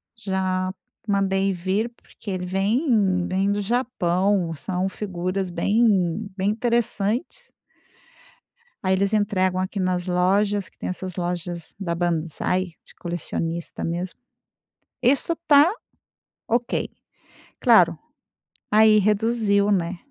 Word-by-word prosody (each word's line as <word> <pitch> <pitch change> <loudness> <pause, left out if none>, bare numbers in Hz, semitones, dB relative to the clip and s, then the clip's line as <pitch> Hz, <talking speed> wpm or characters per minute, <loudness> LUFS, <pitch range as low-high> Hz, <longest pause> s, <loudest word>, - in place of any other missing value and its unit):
já 190 -3 -1 0.3
mandei, 195 -1 +1
vir 190 +5 -1
porque 230 -3 -11
ele 180 -1 -3
vem 195 - +1
vem 195 +2 +1
do 205 0 0
Japão 195 -6 0
são 185 +5 -2
figuras 185 -1 -3
bem 205 -1 +2
bem 195 +1 0
interessantes. 235 - -1 1.3
Aí, 190 -1 +2
eles 195 +2 +1
entregam 190 -3 +1
aqui 190 +2 -3
nas 180 -1 0
lojas 195 +2 +1
que - - -36
tem - - -5
essas 185 -1 -5
lojas 175 -1 -4
da 175 -4 -2
Bansai 170 +2 -1
de - - -15
colecionista 170 -1 -4
mesmo. 175 +2 -3 0.8
Isso 275 +6 +3
tá 295 +3 +7 0.8
ok, 235 +1 0 0.7
claro, - - +5 0.7
aí, 215 0 +6
reduziu, 210 0 +2
né, 180 -2 0
195 Hz, 105 wpm, -23 LUFS, 180-210 Hz, 1.3 s, tá